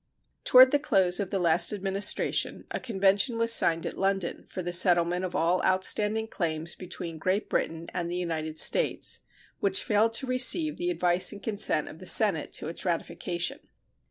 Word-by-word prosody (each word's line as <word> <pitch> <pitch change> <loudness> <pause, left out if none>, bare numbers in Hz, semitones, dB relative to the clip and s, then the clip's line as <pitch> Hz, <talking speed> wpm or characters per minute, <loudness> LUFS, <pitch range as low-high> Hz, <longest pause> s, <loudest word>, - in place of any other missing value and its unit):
Toward 255 +1 +6
the 290 - +2
close 185 -11 +1
of 200 -3 -4
the 200 - -2
last 170 -1 +2
Administration 195 0 -2
a - - -4
convention 200 +1 0
was 230 0 +4
signed 165 -6 +3
at - - -6
London 195 -2 -2
for 185 - -7
the 175 0 -3
settlement 175 0 +3
of 180 -1 -5
all 175 +3 0
outstanding 210 +4 0
claims 165 -4 -2
between 170 -2 -8
Great 185 +5 -2
Britain 165 +1 -3
and 175 -1 -4
the 175 - -5
United 160 -3 -5
States, - - +3 0.4
which 195 -1 +1
failed 220 +2 +1
to 235 +4 0
receive 260 +5 +2
the 350 +1 -3
advice 180 - +1
and 205 - -12
consent 205 -8 -1
of 160 - -12
the 185 - -8
Senate 190 -9 +3
to - - 0
its 165 - -6
ratification. 175 0 -3
185 Hz, 175 wpm, -26 LUFS, 170-215 Hz, 0.4 s, Toward